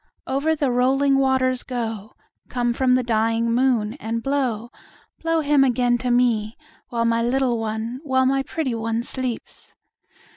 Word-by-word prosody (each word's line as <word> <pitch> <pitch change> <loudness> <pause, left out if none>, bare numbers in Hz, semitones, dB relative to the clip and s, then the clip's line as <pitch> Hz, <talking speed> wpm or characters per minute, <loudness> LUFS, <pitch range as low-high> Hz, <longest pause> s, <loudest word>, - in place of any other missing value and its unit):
Over 285 +4 0
the 285 -4 0
rolling 270 +3 +3
waters 260 -1 +2
go, 225 -4 -5 0.4
Come 240 -1 0
from 255 +1 +2
the 255 - +1
dying 230 0 +1
moon, 240 -4 +1
and 230 +1 -3
blow, 255 -5 -1 0.5
Blow 330 -1 0
him 290 -2 +4
again 245 -1 +2
to 250 +1 -2
me; 235 -3 +1 0.3
While 230 -1 -1
my 230 0 +2
little 245 0 +1
one, 225 +3 -3
while 260 -3 +2
my 270 +1 +2
pretty 275 -2 -3
one, 225 0 -2
sleeps. 255 -2 -6
245 Hz, 150 wpm, -22 LUFS, 230-265 Hz, 0.5 s, him